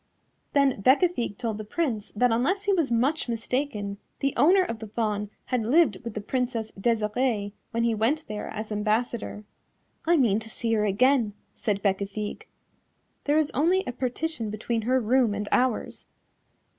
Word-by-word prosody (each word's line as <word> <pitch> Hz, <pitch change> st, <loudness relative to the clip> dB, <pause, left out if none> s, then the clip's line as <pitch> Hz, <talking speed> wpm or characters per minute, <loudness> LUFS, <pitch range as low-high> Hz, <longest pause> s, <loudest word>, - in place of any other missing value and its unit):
Then 275 Hz, -6 st, +3 dB
Bécafigue 260 Hz, -, +3 dB
told 225 Hz, -3 st, -3 dB
the -, -, -4 dB
Prince 220 Hz, -3 st, -2 dB
that 245 Hz, +3 st, +3 dB
unless 325 Hz, -, +1 dB
he 405 Hz, -1 st, +2 dB
was 330 Hz, -7 st, +1 dB
much 255 Hz, +5 st, +1 dB
mistaken 225 Hz, -4 st, -2 dB, 0.2 s
the 275 Hz, 0 st, 0 dB
owner 360 Hz, +9 st, +5 dB
of 230 Hz, -10 st, -4 dB
the 220 Hz, -, -7 dB
Fawn 210 Hz, -1 st, -2 dB, 0.2 s
had 250 Hz, -2 st, 0 dB
lived 250 Hz, -, +3 dB
with 230 Hz, -2 st, -6 dB
the 215 Hz, -, -3 dB
Princess 235 Hz, -1 st, -2 dB
Desirée 215 Hz, 0 st, 0 dB, 0.2 s
when 230 Hz, 0 st, -1 dB
he 235 Hz, -1 st, +2 dB
went 240 Hz, +9 st, +1 dB
there 210 Hz, 0 st, -5 dB
as 215 Hz, 0 st, -6 dB
ambassador. 215 Hz, +1 st, -1 dB, 0.6 s
"I 340 Hz, 0 st, +5 dB
mean 225 Hz, -7 st, +3 dB
to 225 Hz, 0 st, -9 dB
see 225 Hz, +1 st, -2 dB
her 210 Hz, -1 st, +2 dB
again," 230 Hz, +2 st, +3 dB, 0.2 s
said 200 Hz, -2 st, -2 dB
Bécafigue, 200 Hz, +1 st, -2 dB, 0.8 s
"there 295 Hz, +1 st, +3 dB
is 310 Hz, -2 st, +2 dB
only 350 Hz, +8 st, +2 dB
a -, -, -3 dB
partition 250 Hz, 0 st, -2 dB
between 225 Hz, +2 st, -2 dB
her 260 Hz, 0 st, +4 dB
room 240 Hz, -2 st, +2 dB
and 205 Hz, 0 st, -3 dB
ours." 250 Hz, -2 st, 0 dB
230 Hz, 165 wpm, -26 LUFS, 210-270 Hz, 0.8 s, owner